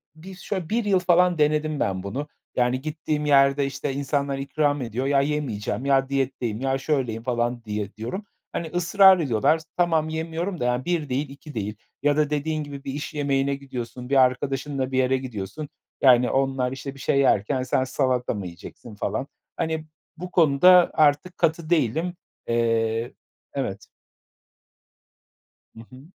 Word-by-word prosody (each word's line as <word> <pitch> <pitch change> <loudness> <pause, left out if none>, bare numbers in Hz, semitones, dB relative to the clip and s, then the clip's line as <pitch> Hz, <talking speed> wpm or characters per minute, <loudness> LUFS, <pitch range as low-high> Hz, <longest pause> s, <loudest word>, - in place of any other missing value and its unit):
bir 185 +4 -11
şöyle 185 -2 -4
1 230 0 0
yıl 195 -2 +3
falan 180 -1 +3
denedim 150 0 +1
ben 95 -1 -1
bunu. 135 +9 -4 0.3
Yani, 125 +1 +1
gittiğim 150 0 -3
yerde, 140 -1 +4
işte, 135 0 -3
insanlar 140 0 -1
ikram 145 0 0
ediyor 120 +2 -3
ya, 140 -1 +3
"Yemeyeceğim." 135 -6 -2
ya 135 -1 +2
"Diyetteyim." 130 -4 -2
ya 135 0 +1
"Şöyleyim." 130 -6 -1
falan 120 -1 -1
diye 105 -1 -4
diyorum. 155 - -5 0.3
Hani, 165 - -3
ısrar 185 +3 +5
ediyorlar. 145 +3 +2 0.2
Tamam 165 -3 +2
yemiyorum 165 +3 -3
da 125 - -1
yani 125 +1 0
1 165 -5 -1
değil 135 +2 -1
2 145 +2 -11
değil 105 -1 -3 0.3
ya 145 0 +3
da 150 -1 +2
dediğin 155 +1 -1
gibi 140 -1 -9
bir 135 - -5
iş 150 +2 -5
yemeğine 140 -1 0
gidiyorsun, 125 -2 -7
bir 140 - +1
arkadaşınla 135 +1 0
bir 130 - -1
yere 130 0 +3
gidiyorsun, 125 +3 -6 0.3
yani, 125 -2 +6
onlar, 135 -1 0
işte, 135 +1 -6
bir - - -14
şey 140 - +1
yerken 130 0 +2
"Sen 130 +1 +1
salata 130 -2 0
mı 100 -3 -5
yiyeceksin?" 90 +5 -10
falan, 110 +7 -3 0.3
hani, 160 -1 -2 0.3
bu 180 +2 -7
konuda 175 +3 +6
artık 155 +4 +2
katı 165 -1 0
değilim. 165 +3 +1 0.3
Eee, 115 0 0 0.4
evet - - -4 1.9
Hı 115 - -12
hı. 130 +3 -14
140 Hz, 160 wpm, -24 LUFS, 125-155 Hz, 1.9 s, yani